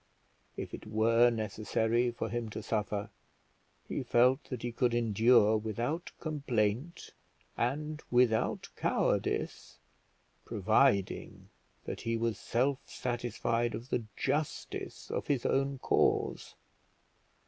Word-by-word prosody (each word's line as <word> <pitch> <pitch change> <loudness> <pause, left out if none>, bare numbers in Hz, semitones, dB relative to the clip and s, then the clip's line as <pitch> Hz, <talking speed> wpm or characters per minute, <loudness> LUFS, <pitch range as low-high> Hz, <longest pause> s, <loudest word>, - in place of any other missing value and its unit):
If - - -5
it - - -8
were 115 +3 +4
necessary 110 +2 0
for 120 - -3
him 120 -2 -3
to 110 0 -6
suffer, 105 -1 -2 0.8
he - - -2
felt 125 +4 +3
that 125 -3 -6
he 120 - -2
could 120 0 +1
endure 110 -1 +4
without 120 - -3
complaint 140 - -1 0.4
and 150 +5 -2
without 120 -3 +2
cowardice, - - -1 0.7
providing 100 -1 +1 0.4
that - - -5
he 115 0 -1
was 115 -2 -1
self 130 +3 +1
satisfied 120 -1 -1
of 115 +4 -8
the 120 - 0
justice 145 +3 -3
of - - -3
his 140 -4 0
own 135 0 +1
cause. - - +1
120 Hz, 110 wpm, -32 LUFS, 110-130 Hz, 0.8 s, were